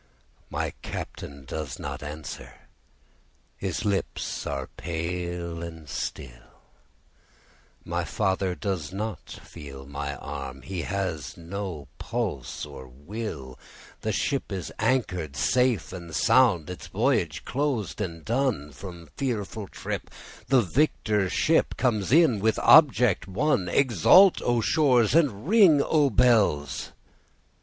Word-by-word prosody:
My - - -2
Captain 70 -1 -7
does 75 -2 -5
not - - -6
answer, 75 -4 -7 1.0
his - - -3
lips 100 -2 -2
are 70 -2 -3
pale 85 +1 -4
and 80 -2 -8
still, - - -7 1.2
My - - -1
father 95 -2 0
does 90 -7 -3
not 105 +2 -5
feel 70 -4 -10
my 70 0 -4
arm, 65 -1 -7
he 90 +5 -4
has 90 -8 -3
no 85 -3 -6
pulse - - -3
nor 70 -3 -10
will, 70 - -7 0.4
The 110 - -1
ship 135 +4 -1
is 95 -7 -4
anchor'd 90 - 0
safe 125 - +1
and 85 -4 -7
sound, 105 -12 +4
its 90 - -8
voyage - - 0
closed 130 -7 -1
and 85 -5 -5
done, 115 - 0
From 85 -3 -10
fearful 110 -5 -3
trip - - -5 0.4
the 125 -1 +4
victor 105 - +1
ship 160 - +2
comes 110 -6 0
in 150 -8 +5
with 110 +2 +2
object 125 - +6
won; 100 -2 +1
Exult 140 - +6
O 120 -1 +1
shores, 125 -4 +3
and 140 -7 +2
ring 195 -8 +6
O 145 0 +3
bells! 105 - +2
95 Hz, 115 wpm, -26 LUFS, 80-120 Hz, 1.2 s, object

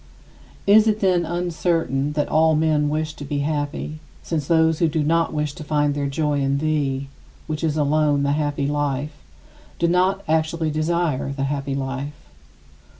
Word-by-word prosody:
Is 210 +2 +6
it, 215 0 +2
then, 180 -4 +2
uncertain 165 -5 -1
that 150 -1 0
all 160 0 +3
men 150 -1 +2
wish 155 0 -2
to 145 - -9
be 145 0 -2
happy, 150 0 -3 0.2
since 155 -4 -2
those 160 -1 +3
who 170 - +3
do 155 0 0
not 165 +2 +2
wish 150 -1 -2
to 155 - -9
find 145 -1 +1
their 140 0 -1
joy 145 0 0
in 135 0 +1
thee 140 -3 -1 0.4
which 155 0 -4
is 155 -1 0
alone 145 -1 +2
the 140 - +1
happy 145 -1 -1
life 145 0 -1 0.6
do 170 - +1
not 185 +3 +2
actually 160 0 0
desire 155 -3 0
the 140 0 -3
happy 140 0 -2
life? 135 +2 -4
150 Hz, 165 wpm, -22 LUFS, 145-160 Hz, 0.6 s, Is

